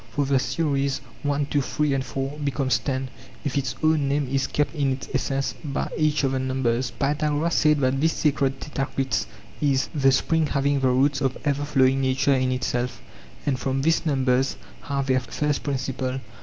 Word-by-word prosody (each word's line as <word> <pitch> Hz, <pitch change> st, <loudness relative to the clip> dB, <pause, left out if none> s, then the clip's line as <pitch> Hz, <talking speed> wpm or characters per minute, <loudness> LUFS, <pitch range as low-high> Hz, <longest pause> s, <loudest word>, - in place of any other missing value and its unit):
For 145 Hz, -1 st, +1 dB
the 135 Hz, -1 st, +3 dB
series, 140 Hz, +1 st, 0 dB, 0.2 s
one 145 Hz, 0 st, 0 dB
two 145 Hz, 0 st, 0 dB
three 150 Hz, +1 st, 0 dB
and 135 Hz, -1 st, 0 dB
four, 135 Hz, +2 st, -4 dB
becomes 135 Hz, -4 st, +1 dB
ten, 130 Hz, +2 st, -2 dB, 0.4 s
if 140 Hz, -, -1 dB
its 135 Hz, -3 st, -1 dB
own 155 Hz, -3 st, +3 dB
name 140 Hz, 0 st, 0 dB
is 135 Hz, +1 st, 0 dB
kept 145 Hz, +2 st, 0 dB
in 140 Hz, -4 st, +1 dB
its 130 Hz, -, -7 dB
essence 135 Hz, 0 st, -1 dB
by 140 Hz, -2 st, -3 dB
each 155 Hz, -1 st, +1 dB
of 135 Hz, -, +2 dB
the 135 Hz, -, 0 dB
numbers. 130 Hz, -1 st, 0 dB
Pythagoras 150 Hz, +4 st, 0 dB
said 150 Hz, -2 st, +3 dB
that 130 Hz, +1 st, +1 dB
this 160 Hz, +1 st, +3 dB
sacred 140 Hz, -3 st, +1 dB
tetraktys 135 Hz, -3 st, -2 dB, 0.3 s
is 140 Hz, -2 st, +2 dB
'the 135 Hz, -3 st, +4 dB
spring 160 Hz, +4 st, +2 dB
having 140 Hz, 0 st, +1 dB
the 135 Hz, -, +2 dB
roots 135 Hz, +2 st, +2 dB
of 135 Hz, -2 st, 0 dB
ever 145 Hz, 0 st, +1 dB
flowing 135 Hz, -2 st, +3 dB
nature' 135 Hz, +2 st, +2 dB
in 130 Hz, -1 st, +1 dB
itself, 125 Hz, -1 st, -2 dB, 0.5 s
and 135 Hz, -3 st, 0 dB
from 135 Hz, 0 st, -1 dB
this 165 Hz, +2 st, +2 dB
numbers 135 Hz, -4 st, +1 dB, 0.3 s
have 140 Hz, -1 st, -1 dB
their 130 Hz, -1 st, +3 dB
first 145 Hz, +3 st, -2 dB
principle. 130 Hz, -1 st, -2 dB
135 Hz, 185 wpm, -24 LUFS, 130-145 Hz, 0.5 s, the